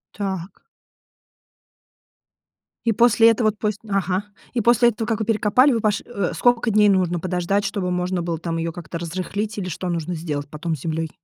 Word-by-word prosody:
Так. 190 -2 -5 2.2
И 230 - +3
после 230 0 +5
этого 220 -1 +2
т 210 - -22
пос 210 -1 -1
Ага. 195 -1 0 0.3
И 240 - +1
после 240 +1 +5
этого, 225 -1 -4
как 225 0 0
вы 220 - -1
перекопали, 225 +5 +3
вы 230 - 0
пош 210 -2 +1
Э, 200 -7 -2
сколько 245 -1 +2
дней 210 0 +5
нужно 180 -3 +2
подождать, 185 +3 -1
чтобы 185 -4 -2
можно 180 0 -1
было 170 -1 -2
там 165 +1 -3
ее 165 0 -2
как-то 170 -1 -7
разрыхлить, 190 +6 -4
или 185 -3 -3
что 180 +3 -4
нужно 170 0 -2
сделать 150 -3 -4
потом 160 +2 -3
с 140 - -12
землей? 160 0 -2
190 Hz, 180 wpm, -22 LUFS, 170-215 Hz, 2.2 s, после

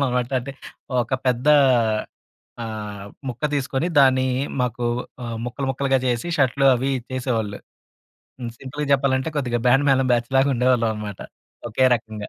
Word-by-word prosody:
వాళ్ళం 140 - +2
అనమాట. 125 0 -1
అంటే 135 +3 -7 0.5
ఒక 120 +3 -2
పెద్ద 125 +2 0 1.2
ఆహ్, 105 -2 -6 0.2
ముక్క 125 +4 -5
తీసుకొని 135 +2 -1
దాన్ని 130 -1 +5 0.3
మాకు 120 -1 -1 0.4
ఆహ్, 115 -1 -4
ముక్కలు 130 +3 -4
ముక్కలుగా 135 0 +1
చేసి 120 +7 -1
షర్ట్‌లు 135 0 +2
అవి 135 +3 -1 0.2
చేసేవాళ్ళు. 115 -5 -2 0.8
హ్మ్. 120 - -4
సింపుల్‌గా 145 +2 -5
చెప్పాలంటే 135 +2 0
కొద్దిగా 120 -4 -1
బ్యాండ్ 135 +3 +4
మ్యాళం 135 -1 +3
బ్యాచ్‌లాగా 135 +3 +2
ఉండేవాళ్ళమన్నమాట 110 -5 0 0.5
ఒకే 130 +4 +3
రకంగా. 110 -2 -6
125 Hz, 130 wpm, -22 LUFS, 115-135 Hz, 1.2 s, దాన్ని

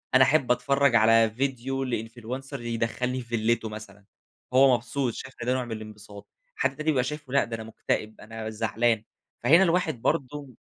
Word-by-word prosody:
أنا 135 - +8
أحِب 135 -2 +3
أتفرَّج 140 +1 +2
على 115 0 +5
فيديو 135 +2 -2
لinfluencer 120 +3 -5
يدخِّلني 120 +2 -2
في 120 - -13
فيلته 115 -1 0
مثلًا، 105 -2 -10 0.5
هو 130 0 +6
مبسوط، 120 +1 -2
شايف 130 0 -8
ده 125 +1 +1
نوع 130 -1 -1
من 120 - -9
الانبساط. 105 -2 -9 0.3
حد 135 - 0
تاني 155 - -4
بيبقى 130 -5 +2
شايفه 145 -1 -6
لأ، 140 - +4
ده 115 0 -5
أنا 110 - -7
مكتئب، 110 -1 -3
أنا 110 0 -6
زعلان، 110 0 0 0.4
فهنا 165 +9 +6
الواحد 170 -9 +1
برضه 135 -2 -2
120 Hz, 170 wpm, -26 LUFS, 110-135 Hz, 0.5 s, أنا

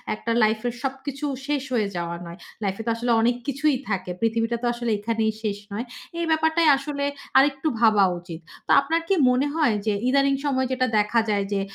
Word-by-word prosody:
একটা 230 - -4
লাইফ 215 0 +2
এর 240 - -2
সবকিছু 270 +1 -4 0.2
শেষ 285 -2 0
হয়ে 215 -4 +1
যাওয়া 170 0 -3
নয়। 170 +1 -9 0.3
লাইফ 195 -1 -1
এ - - -6
তো - - +2
আসলে 240 +1 -1
অনেক 240 +1 +2
কিছুই 280 +1 +1
থাকে। 185 -2 -2
পৃথিবীটা 230 +1 0
তো - - +1
আসলে 240 -1 -2
এখানেই 220 0 0
শেষ 205 -2 -1
নয়। 225 +5 -3 0.3
এই 340 - 0
ব্যাপারটাই 320 +1 +3
আসলে 280 0 -4 0.3
আরেকটু 275 +2 +3
ভাবা 215 -4 +5 0.2
উচিত। 170 -2 -9 0.3
তো - - 0
আপনার 325 +4 0
কি 390 - +2 0.2
মনে 255 +3 +2
হয় 295 -9 +2
যে, 215 - +2 0.2
ইদানিং 275 0 +3
সময়ে 260 -2 +1
যেটা 255 0 +1
দেখা 210 +3 +2
যায় 200 -1 +1
যে, 195 - 0
240 Hz, 200 wpm, -24 LUFS, 215-275 Hz, 0.3 s, ভাবা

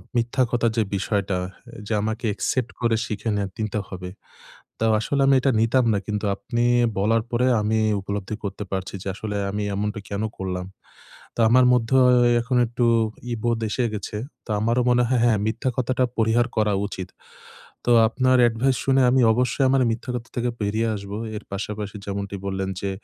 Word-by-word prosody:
মিথ্যা 120 +2 +1
কথার 120 -1 +2
যে 110 - +4
বিষয়টা, 100 -1 -1 0.4
এ - - -10
যে 115 - -1
আমাকে 110 +2 -3
অ্যাকসেপ্ট 120 +4 -1
করে 115 -1 +2
শিখে 105 +1 -4
নিয়া 100 -1 -1
তিন্তে 110 -1 -2
হবে। 90 -1 -7 0.7
তাও 115 0 +2
আসলে 140 +5 0
আমি 135 - +5
এটা 135 - +3
নিতাম 120 +2 +3
না। 100 - +1
কিন্তু 105 0 -2
আপনি 120 +4 -2 0.4
বলার 110 +3 +2
পরে, 120 +1 +2 0.2
আমি 110 +1 +1 0.2
উপলব্ধি 100 +1 -4
করতে 100 0 -4
পারছি। 95 -1 -3
যে, - - -7
আসলে 105 0 -5 0.2
আমি 105 +1 -2
এমনটা 105 +2 -2
কেন 100 +1 -2 0.2
করলাম? 90 -1 -3 0.7
তো - - -8
আমার 125 +2 +5
মধ্যে 125 +1 +2 0.4
এখন 125 +1 0
একটু 120 +1 -1 0.5
ই - - 0
বোধ 120 -1 +1
এসে 125 - -1
গেছে। 105 0 -5 0.3
তো - - -21
আমারও 115 +3 +1
মনে 125 0 +4
হয়, 125 -1 +2
হ্যাঁ, 110 -3 +3
মিথ্যা 115 +4 -1
কথাটা 130 +1 +1
পরিহার 115 +1 +2
করা 105 -1 +2
উচিত। 95 -3 -7 0.8
তো 120 - +2 0.2
আপনার 130 +2 +2
অ্যাডভাইস 120 +3 +2
শুনে 135 0 +4
আমি 130 0 +4
অবশ্যই 125 +3 +1
আমার 135 0 +3
মিথ্যা 115 +4 -5
কথা 120 -1 -6
থেকে 120 0 0
বেরিয়ে 110 +3 0
আসবো। 100 0 -6 0.2
এর 105 - -9
পাশাপাশি 105 +1 -5
যেমনটি 100 0 -4
বললেন 95 0 -2
যে, 100 - -2
110 Hz, 180 wpm, -23 LUFS, 100-120 Hz, 0.8 s, আমি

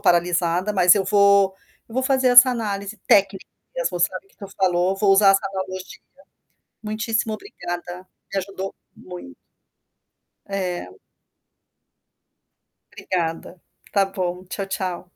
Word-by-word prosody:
paralisada, 175 +2 +1
mas 180 -3 +6
eu 200 -2 0
vou 200 -1 +4 0.3
eu - - -15
vou 260 - 0
fazer 265 -1 +2
essa 250 +1 +9
análise 210 -3 -4
técnica 195 -1 +3 0.3
mesmo, - - -2
sabe, 395 - -1
que - - -30
tu 200 - -9
falou, 185 0 +1
vou 200 0 +2
usar 195 0 +6
essa 195 0 +3
analogia. 185 -1 -6 0.9
Muitíssimo 220 +1 -2
obrigada, 180 - -7 0.3
me 195 - -1
ajudou 195 0 -6 0.2
muito. 175 - -11 1.1
É. 180 - -4 2.0
Obrigada. 170 0 -4 0.2
Está 200 -1 +1
bom, 185 -2 -4
tchau, 195 +2 -5
tchau. 185 -2 -4
195 Hz, 120 wpm, -22 LUFS, 180-210 Hz, 2.0 s, essa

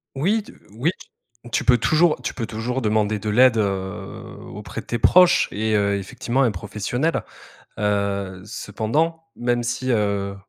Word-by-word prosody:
Oui 200 +10 +1
tu - - -14 0.2
oui 125 +10 0
tu - - -14 0.5
tu - - +1
peux 125 -1 +6
toujours 155 +6 +3
tu - - -2
peux 115 -3 -4
toujours 120 +4 -3
demander 105 -1 +1
de 105 - -3
l'aide, 120 +2 +5
heu, 95 -2 -3 0.2
auprès - - -7
de - - -22
tes 120 - -1
proches 180 +9 +5
et 110 +1 0
heu, 100 -1 +2
effectivement 120 +5 -2
un 120 - +3
professionnel. 105 - -2 0.6
Heu, 100 -2 -1
cependant 130 +11 -2
même 120 0 0
si, 130 +2 -2
heu, 100 -3 0
110 Hz, 160 wpm, -22 LUFS, 105-130 Hz, 0.6 s, peux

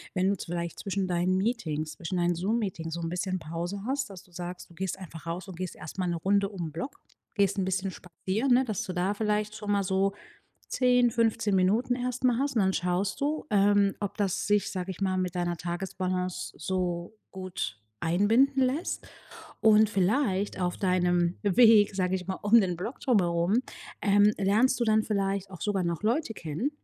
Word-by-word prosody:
wenn 185 0 +2
du 200 - +2
z - - -7
vielleicht 170 -1 -4
zwischen 195 -1 -2
deinen 180 +1 +1
Meetings, 165 -8 -1
zwischen 175 +1 -4
deinen 175 0 +2
Zoom-Meetings 180 -3 -2
so 170 - -5
'n 165 - -2
bisschen 185 +2 -2
Pause 175 +4 -5
hast, 270 0 -1
dass 190 -3 -10
du 180 - -24
sagst, 180 +1 -7
du - - -16
gehst 190 +2 -3
einfach 170 -3 -10
raus 170 +2 -4
und 185 -3 -9
gehst 185 -1 -4
erst 165 - -9
mal 185 - 0
'ne 175 - 0
Runde 200 +3 +1
um 180 -5 -5
'n - - -14
Block, 170 - -5 0.4
gehst 200 -1 +2
'n 185 - +1
bisschen 190 +1 -1
spazieren, 190 +9 -3
ne, 255 +1 +4
dass 215 -5 -2
du 185 - -5
da 180 +3 0
vielleicht 210 0 -1
schon 210 -1 -4
mal 200 -1 +2
so 190 +1 +1 0.6
10, 250 -1 +3
15 225 -2 +1
Minuten 215 +7 +2
erst 250 0 -3
mal 245 -2 +4
hast. 275 0 0
Und 215 - +4
dann 190 0 +2
schaust 180 +7 -1
du, 295 +2 -1
ähm, 200 -1 +4
ob 205 -2 -3
das 195 -3 -1
sich- 205 0 +2
sage 185 0 -3
ich 185 - -13
mal- 190 -1 +1
mit 180 -1 -2
deiner 175 -1 -1
Tagesbalance 180 +1 -3
so 180 -1 -2 0.2
gut 185 - -5 0.2
einbinden 225 +11 +3
lässt. 275 +7 -2 0.5
Und 215 -1 +5
vielleicht 200 0 +1
auf 180 -1 -1
deinem 180 -2 +2
Weg, 210 0 +6
sage 185 -1 0
ich 180 -1 -3
mal, 190 - -2
um 220 +3 +6
den 180 -2 -1
Block 195 +9 -5
drum 250 -5 +3
herum, 170 +2 +1 0.5
ähm, 205 +1 +5
lernst 220 +6 +3
du - - +3
dann 220 -1 +3
vielleicht 195 -2 -1
auch 185 - -10
sogar 205 -3 0
noch 170 +1 -2
Leute 235 +4 0
kennen, 165 - -3
195 Hz, 200 wpm, -28 LUFS, 180-215 Hz, 0.6 s, Weg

